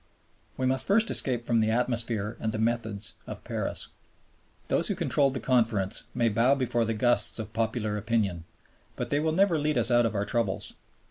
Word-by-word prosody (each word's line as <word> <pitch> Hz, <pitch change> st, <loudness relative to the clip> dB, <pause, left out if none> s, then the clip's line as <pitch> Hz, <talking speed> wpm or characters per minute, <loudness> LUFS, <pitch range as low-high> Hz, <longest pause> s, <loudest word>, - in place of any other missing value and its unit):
We 130 Hz, -, -1 dB
must 130 Hz, 0 st, 0 dB
first 220 Hz, +3 st, +3 dB
escape 120 Hz, -3 st, +3 dB
from 120 Hz, -1 st, +2 dB
the 110 Hz, 0 st, +2 dB
atmosphere 115 Hz, -2 st, -1 dB
and 110 Hz, -, -2 dB
the 110 Hz, -, -4 dB
methods 110 Hz, -2 st, 0 dB
of -, -, -8 dB
Paris. -, -, -3 dB, 0.8 s
Those -, -, +1 dB
who -, -, -1 dB
controlled 140 Hz, -2 st, +1 dB
the -, -, -2 dB
Conference 115 Hz, -6 st, 0 dB
may 120 Hz, -, +2 dB
bow 115 Hz, +5 st, +3 dB
before 120 Hz, -3 st, 0 dB
the 115 Hz, 0 st, -2 dB
gusts 120 Hz, +3 st, +2 dB
of 110 Hz, -1 st, -6 dB
popular 110 Hz, -2 st, -1 dB
opinion, 100 Hz, -6 st, -1 dB, 0.5 s
but -, -, -5 dB
they 145 Hz, -, +2 dB
will 160 Hz, +1 st, 0 dB
never 175 Hz, -1 st, +2 dB
lead 150 Hz, -1 st, 0 dB
us 120 Hz, +1 st, +2 dB
out 120 Hz, -1 st, +4 dB
of 110 Hz, -, -5 dB
our 100 Hz, 0 st, 0 dB
troubles. 115 Hz, -5 st, -2 dB
115 Hz, 190 wpm, -27 LUFS, 110-130 Hz, 0.8 s, out